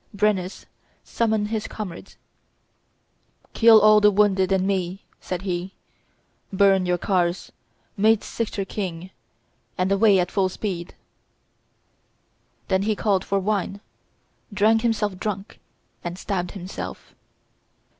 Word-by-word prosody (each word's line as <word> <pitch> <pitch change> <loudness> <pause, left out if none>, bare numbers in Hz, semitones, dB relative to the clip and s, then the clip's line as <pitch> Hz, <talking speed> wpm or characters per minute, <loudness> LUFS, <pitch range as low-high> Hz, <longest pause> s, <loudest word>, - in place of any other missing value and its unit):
Brennus 200 -3 -1 0.4
summoned 220 -2 -1
his 220 -1 -3
comrades 195 -6 -8 1.4
"Kill 225 -1 +7
all 215 0 +6
the 210 - +6
wounded 195 -2 +2
and 190 -1 +2
me," 190 -1 -2 0.2
said 180 0 -5
he; 185 0 -4 0.8
"burn 195 -1 +3
your 180 0 +1
cars; 175 -1 -1 0.4
make 220 +1 +3
Cichor 210 -4 -3
king; 185 -3 -5 0.7
and 185 +1 0
away 200 0 +5
at 180 -1 0
full 190 -2 +1
speed." 180 -3 -5 1.7
Then 190 0 +1
he 215 +1 0
called 200 -3 +1
for 200 - -1
wine, 200 0 -1 0.7
drank 215 +2 +3
himself 210 -5 -1
drunk, 200 0 -5 0.4
and 175 +1 -5
stabbed 185 -2 -3
himself. 190 -1 -8
195 Hz, 115 wpm, -23 LUFS, 185-210 Hz, 1.7 s, Kill